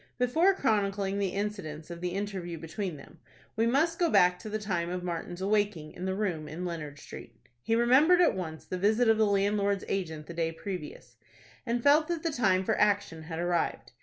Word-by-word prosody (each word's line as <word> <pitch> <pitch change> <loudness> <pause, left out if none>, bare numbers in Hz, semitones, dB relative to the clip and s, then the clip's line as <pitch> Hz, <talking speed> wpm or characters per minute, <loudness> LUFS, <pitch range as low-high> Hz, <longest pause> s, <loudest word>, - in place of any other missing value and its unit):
Before 320 +11 +3
chronicling 200 - 0
the 200 - +1
incidents 195 -7 -4
of 170 0 -8
the 180 -1 -2
interview 190 -4 -4
between 165 +2 -5
them, 150 +4 -15 0.4
we 225 +1 +2
must 315 +7 +2
go 345 -2 +3
back 180 -8 +4
to 215 - -8
the 215 - -2
time 180 -5 -2
of 180 0 -4
Martin's 175 +1 -4
awaking 200 -6 0
in 180 - -7
the 190 0 -1
room 180 -7 -2
in 165 +4 -5
Leonard 155 -5 -5
Street. - - -11 0.3
He 225 - 0
remembered, 265 +10 +5
at 350 - +5
once, 160 -5 -6
the 185 - -4
visit 220 +5 +3
of 220 0 +4
the 215 - +4
landlord's 200 0 +1
agent 160 -6 -3
the 170 - -8
day 165 -1 -1
previous, 180 -2 -7 0.5
and 235 0 -1
felt 300 +2 +5
that 340 -2 -3
the 330 - 0
time 195 -8 +2
for - - +1
action 205 -6 +1
had 165 0 -6
arrived. 170 -8 -1
195 Hz, 200 wpm, -29 LUFS, 170-220 Hz, 0.5 s, remembered